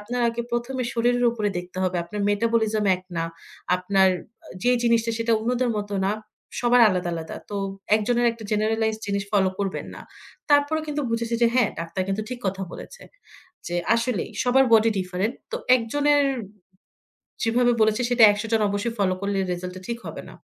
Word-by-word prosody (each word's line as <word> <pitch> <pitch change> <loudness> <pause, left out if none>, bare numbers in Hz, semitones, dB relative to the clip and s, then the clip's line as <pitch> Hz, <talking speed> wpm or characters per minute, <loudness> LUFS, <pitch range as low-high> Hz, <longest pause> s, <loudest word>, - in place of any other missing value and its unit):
"আপনার 245 +4 -3
আগে 235 +1 -3
১ম 240 +2 -2
এ - - -3
শরীরের 245 +1 +2
উপরে 215 -3 -1
দেখতে 180 +1 -8
হবে। 185 -1 0
আপনার 205 +5 -6
মেটাবলিজম 220 0 +1
এক 185 - -14
না। 165 - 0 0.5
আপনার 190 +1 +3 0.4
আ - - -15 0.2
যেই 245 +1 +3
জিনিসটা 230 -1 +2
সেটা 230 0 +1
অন্যদের 245 +2 0
মত 205 0 -5 0.2
না। 200 - +1 0.5
সবার 245 0 +4
আলাদা, 180 -3 -1
আলাদা। 160 -1 -6
তো, 205 - -3 0.4
একজনের 240 +3 +1
একটা 230 -1 -11
জেনারালাইজড 220 +1 0
জিনিস 200 -1 -1
ফলো 195 -2 +3
করবেন 195 -2 -3
না।" - - -10 0.5
তারপরেও 290 +2 +3
কিন্তু 295 0 -2
বুঝেছি 230 0 -1
যে - - +7
হ্যাঁ, 250 -4 +3
ডাক্তার 165 +3 -3
কিন্তু 195 +2 -1
ঠিক 250 - -4
কথা 190 0 -2
বলেছে। - - -10 0.7
যে 175 - -3 0.2
আসলেই, 230 -4 -1
সবার 265 +2 +4
বডি 225 0 +6
ডিফারেন্ট। 185 +5 -2 0.2
তো, 480 - -1 0.2
একজনের 290 +5 +2 1.2
যেভাবে 240 +1 +3
বলেছে, 220 +2 +3
সেটা 245 -1 +3
১০০ 205 +1 -3
জন 225 - +3
অবশ্যই 205 +3 -2
ফলো 190 -2 +2
করলে, 200 0 -1
রেজাল্টটা 180 +1 -6
ঠিক 235 -1 -3
হবে - - -7
না। - - -13
225 Hz, 175 wpm, -24 LUFS, 200-240 Hz, 1.2 s, যে